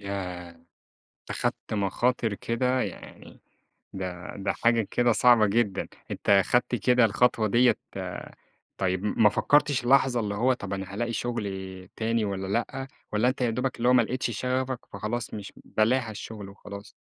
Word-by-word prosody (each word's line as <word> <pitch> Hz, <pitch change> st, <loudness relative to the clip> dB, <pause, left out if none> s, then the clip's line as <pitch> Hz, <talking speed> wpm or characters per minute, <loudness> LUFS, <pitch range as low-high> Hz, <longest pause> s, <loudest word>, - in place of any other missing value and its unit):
ياه! 90 Hz, -4 st, -5 dB, 0.7 s
أخدت -, -, -3 dB
مخاطر 110 Hz, +2 st, 0 dB
كده 125 Hz, +4 st, 0 dB
يعني، 95 Hz, -5 st, -8 dB, 0.5 s
ده 90 Hz, -2 st, -6 dB
ده 100 Hz, -, -1 dB
حاجة 115 Hz, -2 st, +2 dB
كده 120 Hz, -1 st, +3 dB
صعبة 120 Hz, -2 st, +5 dB
جدًا! 105 Hz, -1 st, 0 dB, 0.2 s
أنت 100 Hz, -1 st, +3 dB
خدت 120 Hz, 0 st, +1 dB
كده 125 Hz, +2 st, +3 dB
الخطوة 110 Hz, +1 st, +2 dB
ديّة 120 Hz, +4 st, +4 dB, 1.0 s
طيب 95 Hz, +1 st, 0 dB
م 105 Hz, -, +1 dB
ما 105 Hz, -, +8 dB
فكرتش 145 Hz, +3 st, +2 dB
لحظة 130 Hz, -2 st, +4 dB
اللي 105 Hz, -2 st, -2 dB
هو 125 Hz, +5 st, +3 dB
طَب 100 Hz, -6 st, -5 dB
أنا 95 Hz, 0 st, -4 dB
هالاقي 120 Hz, +2 st, -2 dB
شغل 95 Hz, -6 st, -4 dB
تاني 115 Hz, 0 st, 0 dB
والّا 95 Hz, -1 st, -3 dB
لأ، 120 Hz, +6 st, -2 dB, 0.2 s
والّا 110 Hz, +4 st, +3 dB
أنت 130 Hz, +1 st, -2 dB
يا 120 Hz, -, +2 dB
دوبك 125 Hz, +3 st, -2 dB
اللي 120 Hz, +1 st, +1 dB
هو -, -, +6 dB
ما 125 Hz, -2 st, +6 dB
لقيتش 125 Hz, +1 st, -2 dB
شغفك، 130 Hz, 0 st, -1 dB
فخلاص 105 Hz, +4 st, -4 dB
مش 100 Hz, -2 st, -7 dB
بلاها 115 Hz, +2 st, +1 dB
الشُغل 105 Hz, -1 st, -8 dB
وخلاص؟ 100 Hz, 0 st, -10 dB
110 Hz, 155 wpm, -27 LUFS, 100-125 Hz, 1.0 s, ما